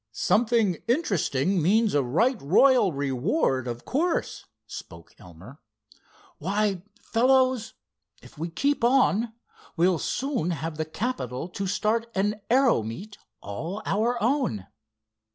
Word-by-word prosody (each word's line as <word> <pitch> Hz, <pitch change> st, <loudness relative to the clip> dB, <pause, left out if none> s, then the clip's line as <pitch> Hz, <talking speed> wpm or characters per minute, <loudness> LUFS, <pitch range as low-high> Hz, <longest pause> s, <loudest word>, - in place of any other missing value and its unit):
"'Something 215 Hz, -, +2 dB
interesting' 195 Hz, -, +1 dB
means 215 Hz, +6 st, +3 dB
a 145 Hz, -, +3 dB
right 205 Hz, -, +1 dB
royal 205 Hz, -, +4 dB
reward, 135 Hz, -, 0 dB
of 120 Hz, 0 st, -6 dB
course," 330 Hz, +6 st, -1 dB, 0.2 s
spoke 85 Hz, -5 st, -11 dB
Elmer. 90 Hz, -, -14 dB, 0.8 s
"Why, 200 Hz, +2 st, 0 dB, 0.2 s
fellows, 255 Hz, -1 st, +2 dB, 0.4 s
if -, -, -16 dB
we 165 Hz, +3 st, -4 dB
keep 280 Hz, +9 st, 0 dB
on, 235 Hz, -3 st, +3 dB, 0.5 s
we'll 175 Hz, 0 st, +3 dB
soon 260 Hz, -, -2 dB
have 160 Hz, -1 st, -4 dB
the 155 Hz, -, -2 dB
capital 155 Hz, -, -4 dB
to 195 Hz, +2 st, -4 dB
start 220 Hz, +4 st, 0 dB
an 205 Hz, +2 st, 0 dB
aero 255 Hz, -, +4 dB
meet 180 Hz, -, -8 dB, 0.2 s
all 165 Hz, -, -6 dB
our 235 Hz, +4 st, 0 dB
own!" 230 Hz, -, 0 dB
200 Hz, 115 wpm, -26 LUFS, 150-240 Hz, 0.8 s, royal